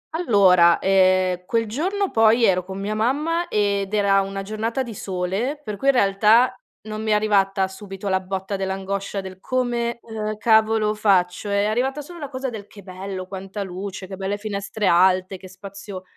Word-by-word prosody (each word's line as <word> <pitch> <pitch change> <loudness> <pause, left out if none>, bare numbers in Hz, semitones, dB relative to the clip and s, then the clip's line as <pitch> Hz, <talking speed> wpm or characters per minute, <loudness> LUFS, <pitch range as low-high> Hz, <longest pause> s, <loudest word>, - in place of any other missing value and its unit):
Allora, 190 - +5
ehm, 185 -1 +2
quel 230 -1 0
giorno 375 - -1
poi 225 +1 +4
ero 185 -1 +2
con 190 +1 -8
mia 205 +2 -3
mamma 300 +10 0
ed 200 -1 0
era 200 -1 +3
una 195 0 -4
giornata 220 +5 -2
di 235 -3 -8
sole, 195 +9 -3
per 210 -2 -5
cui, 235 +7 -4
in 275 - +5
realtà, 215 +4 +4 0.3
non 215 0 -6
mi 220 - -3
è - - +4
arrivata 195 -2 +2
subito 195 0 -8
la 190 - +2
botta 190 +1 -4
dell'angoscia 195 +1 -3
del: 190 -1 -10
"Come, 240 0 -1
ehm, 215 -1 -5
cavolo 220 -1 +3
faccio?", 200 -2 +1
è 200 0 +1
arrivata 255 +7 -1
solo 345 +4 -11
la 290 -3 -6
cosa 260 -1 -4
del: 210 -3 -8
"Che 200 - -14
bello, 185 0 -6
quanta 195 +2 -6
luce, 190 +1 -6
che 190 +1 -8
belle 195 +2 -3
finestre 205 0 -4
alte, 185 +1 +3
che 185 0 -13
spazio 195 0 -9
200 Hz, 180 wpm, -22 LUFS, 190-225 Hz, 0.3 s, Allora